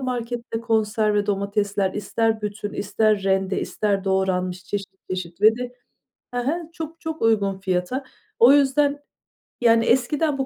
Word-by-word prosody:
markette 240 -2 -3
konserve 215 -2 +1
domatesler 200 -1 0
ister 220 +2 0
bütün, 205 0 -4
ister 210 0 +1
rende, 190 0 +1
ister 200 -2 -1
doğranmış. 185 -1 0
Çeşit 200 0 -3 0.2
çeşit 185 0 -5
ve 220 +2 +6
de, 250 0 -6 0.6
he 245 - -2
he, 280 +6 +1 0.2
çok 325 +1 -7
çok 320 -1 -5
uygun 200 -4 +2
fiyata. 190 +8 -2 0.4
O 245 +4 +8
yüzden, 285 +1 +3 0.6
yani 230 -1 +4
eskiden 275 +4 +2
bu 270 - -1
215 Hz, 140 wpm, -23 LUFS, 195-245 Hz, 0.6 s, O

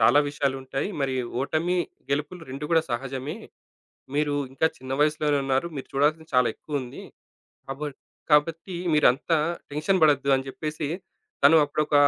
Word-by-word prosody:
చాలా 115 +6 +6
విషయాలు 140 -2 -1
ఉంటాయి. 135 +6 -3
మరి 135 -1 0 0.3
ఓటమి, 170 +5 0 0.3
గెలుపులు 150 +5 -2
2 135 +3 -5
కూడా 160 - +5
సహజమే. 135 - -3 0.8
మీరు 150 -1 +1 0.2
ఇంకా 160 +4 +3
చిన్న 130 0 -8
వయసులోనున్నారు. 150 -1 +2
మీరు 135 - -6
చూడాల్సింది 155 +3 +1
చాలా 125 -1 +5
ఎక్కువుంది. 140 -5 -5 0.7
కాబ 135 +2 -6 0.5
కాబట్టి 165 +5 +2 0.2
మీరంతా 150 +3 +4 0.3
టెన్షన్ 160 +5 +1
బడొద్దు" 140 -2 +3
అని 130 - -4
జెప్పేసి 150 +1 -4 0.5
తను 160 +3 +8
అప్పుడొక 150 +1 -1
145 Hz, 130 wpm, -26 LUFS, 135-155 Hz, 0.8 s, తను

